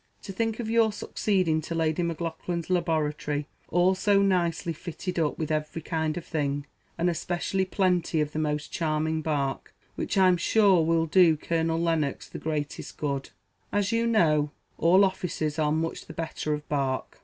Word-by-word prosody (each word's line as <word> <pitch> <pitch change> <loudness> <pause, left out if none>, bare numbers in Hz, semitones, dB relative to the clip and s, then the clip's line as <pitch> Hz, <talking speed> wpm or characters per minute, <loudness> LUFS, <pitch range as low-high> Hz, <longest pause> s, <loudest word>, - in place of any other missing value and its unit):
To 195 - -7
think 225 +3 -1
of 235 - -3
your 225 -1 +3
succeeding 185 -6 0
to 165 +2 -5
Lady 160 +1 +1
Maclaughlan's 170 0 -3
laboratory, 150 -4 0 0.2
all 175 +3 +4
so 200 +1 +3
nicely 175 -3 +1
fitted 170 +2 -5
up 155 -2 0
with 155 -1 -3
every 155 +1 -2
kind 160 -1 -1
of 170 - -6
thing, 145 -2 -2 0.3
and 170 +1 +1
especially 175 +3 -1
plenty 180 -4 +1
of 150 -1 0
the 155 - -3
most 150 -1 -2
charming 160 0 0
bark, 145 -3 -2 0.2
which, - - -3
I'm 185 -2 +5
sure, 190 -1 +4
will 165 0 +2
do 165 -1 +5
Colonel 165 +1 0
Lennox 165 -4 0
the - - -8
greatest 150 -2 -4
good, 140 -2 -2 0.4
as 205 -1 +1
you 230 0 +1
know 155 -10 +3 0.3
all 185 +4 +6
officers 160 -5 -2
are 150 -1 +2
much 160 +1 -2
the 160 - -8
better 160 -1 -3
of 150 0 -9
bark. 135 -3 -2
165 Hz, 165 wpm, -27 LUFS, 155-180 Hz, 0.4 s, all